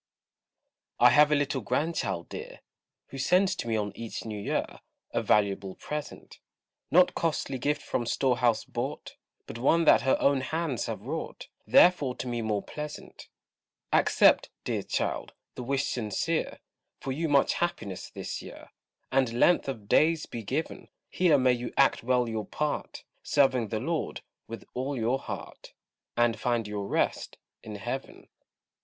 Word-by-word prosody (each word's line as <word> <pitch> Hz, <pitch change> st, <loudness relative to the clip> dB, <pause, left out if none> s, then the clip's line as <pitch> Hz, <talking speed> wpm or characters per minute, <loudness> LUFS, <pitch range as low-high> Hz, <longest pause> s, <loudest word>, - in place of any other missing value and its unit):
I 125 Hz, 0 st, +7 dB
have 150 Hz, +4 st, +6 dB
a -, -, +5 dB
little 145 Hz, -2 st, 0 dB
Grandchild 100 Hz, -, -1 dB
dear, -, -, -8 dB, 0.5 s
Who 135 Hz, -, -8 dB
sends 185 Hz, +6 st, +3 dB
to -, -, -4 dB
me 115 Hz, -, 0 dB
on 105 Hz, -1 st, -2 dB
each 115 Hz, -1 st, -6 dB
new 105 Hz, -2 st, -5 dB
year -, -, 0 dB, 0.5 s
A -, -, 0 dB
valuable 100 Hz, -1 st, +1 dB
present: 150 Hz, 0 st, -7 dB, 0.5 s
Not 180 Hz, +2 st, +5 dB
costly 150 Hz, -5 st, -1 dB
gift 150 Hz, +4 st, -1 dB
from 120 Hz, -, -2 dB
store 130 Hz, 0 st, +1 dB
house 115 Hz, -2 st, +2 dB
bought, -, -, -5 dB, 0.3 s
But 115 Hz, -, -8 dB
one 165 Hz, +6 st, +3 dB
that -, -, +6 dB
her 130 Hz, -, +2 dB
own 140 Hz, -1 st, +3 dB
hands 155 Hz, -2 st, -2 dB
have -, -, -4 dB
wrought, -, -, -5 dB, 0.2 s
Therefore 145 Hz, -8 st, +5 dB
to 120 Hz, -, -5 dB
me 120 Hz, -1 st, -2 dB
more 105 Hz, -2 st, -1 dB
pleasant. 150 Hz, 0 st, -8 dB, 0.7 s
Accept, -, -, +4 dB
dear -, -, -1 dB
child, -, -, -2 dB, 0.2 s
the -, -, -7 dB
wish 135 Hz, +2 st, 0 dB
sincere, 125 Hz, +8 st, -2 dB, 0.4 s
For 135 Hz, -, -4 dB
you 160 Hz, +4 st, -1 dB
much 140 Hz, -1 st, +4 dB
happiness 100 Hz, -, -3 dB
this -, -, -6 dB
year, -, -, -12 dB, 0.4 s
And 130 Hz, -3 st, +2 dB
length 175 Hz, -3 st, +4 dB
of 110 Hz, -6 st, -6 dB
days 160 Hz, +5 st, +3 dB
be 115 Hz, -, -6 dB
given; 135 Hz, +10 st, -4 dB, 0.2 s
Here 175 Hz, -5 st, +4 dB
may 130 Hz, -1 st, +4 dB
you 120 Hz, 0 st, -4 dB
act 140 Hz, -, +4 dB
well 125 Hz, 0 st, +1 dB
your 110 Hz, -2 st, -3 dB
part, 150 Hz, -1 st, -3 dB, 0.2 s
Serving 130 Hz, -5 st, +2 dB
the 110 Hz, 0 st, -2 dB
Lord 160 Hz, +6 st, -3 dB, 0.2 s
with 115 Hz, -2 st, -8 dB
all 135 Hz, +2 st, -3 dB
your 120 Hz, +3 st, +1 dB
heart, -, -, -8 dB, 0.4 s
And 120 Hz, -1 st, +2 dB
find 120 Hz, -3 st, 0 dB
your 105 Hz, -1 st, -4 dB
rest -, -, -1 dB, 0.2 s
in 105 Hz, -, -8 dB
heaven. 120 Hz, +6 st, -6 dB
130 Hz, 155 wpm, -28 LUFS, 115-150 Hz, 0.7 s, I